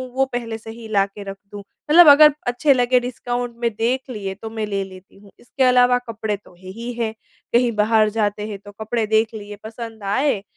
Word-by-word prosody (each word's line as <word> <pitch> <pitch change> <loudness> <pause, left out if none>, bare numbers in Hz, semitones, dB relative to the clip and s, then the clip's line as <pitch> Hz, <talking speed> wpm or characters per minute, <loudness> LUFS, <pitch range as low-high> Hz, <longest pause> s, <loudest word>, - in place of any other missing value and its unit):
वो 270 - +3
पहले 230 -2 -3
से 225 0 -10
ही 225 -1 -10
ला 195 -2 +3
के 200 +1 -11
रख 195 0 -7
दूँ 205 - -8
मतलब 305 - +4
अगर 300 0 +7
अच्छे 260 +4 +3
लगे 250 0 +3
डिस्काउंट 245 -1 -4
में 235 - +2
देख 255 +3 -1
लिए 200 -5 -5
तो 220 +2 -8
मैं 220 -1 -4
ले 200 -1 -2
लेती 190 0 -14
हूँ। 200 -1 -18
इसके 260 +2 -2
अलावा 250 0 +5
कपड़े 220 -2 -3
तो 195 - -21
है 185 - -11
ही 235 +4 -6
है। 230 -2 -2 0.4
कहीं 240 0 +3
बाहर 215 0 +3
जाते 210 -1 -2
हैं 205 -2 -6
तो 205 - -10
कपड़े 225 0 -1
देख 220 +1 +1
लिए 205 -1 -8
पसंद 225 -1 -8
आए 265 -7 +1
225 Hz, 215 wpm, -21 LUFS, 210-245 Hz, 0.4 s, अगर